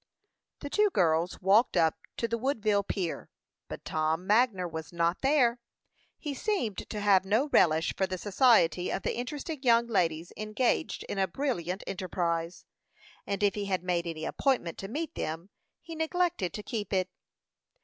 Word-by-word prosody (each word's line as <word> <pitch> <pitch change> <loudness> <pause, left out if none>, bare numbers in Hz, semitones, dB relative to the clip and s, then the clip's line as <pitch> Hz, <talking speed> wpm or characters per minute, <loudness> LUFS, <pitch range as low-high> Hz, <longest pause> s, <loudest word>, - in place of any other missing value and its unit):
The 285 - -5
two 420 0 +3
girls 170 - +1
walked 205 +3 +4
up 160 -2 +4 0.2
to 230 - 0
the 230 0 -2
Woodville 220 -6 +1
pier; 190 -4 -4 0.4
but - - -8
Tom 160 +3 -1
Magner 210 -4 +3
was 160 -2 -7
not 170 +1 0
there. 265 -4 +3 0.6
He 295 -3 -4
seemed 275 - -2
to 210 - -4
have 200 -2 +4
no 220 +9 +1
relish 160 - +3
for 190 - 0
the 185 0 -3
society 190 - +3
of 195 - -3
the - - -1
interesting 290 +4 -5
young 235 -3 +4
ladies 170 -7 0
engaged 215 +4 -1
in 200 - -4
a 190 - +2
brilliant 185 - -2
enterprise; 175 -3 -3 0.6
and 200 0 -2
if 205 - +3
he 205 -1 -3
had 185 -2 -1
made 175 -1 -1
any 160 -1 -4
appointment 250 - 0
to 195 - -5
meet 310 +8 -4
them, 165 +5 -5 0.3
he 330 - -8
neglected 320 - 0
to 210 - -6
keep 215 -3 -4
it. 185 -1 +1
200 Hz, 165 wpm, -29 LUFS, 175-245 Hz, 0.6 s, walked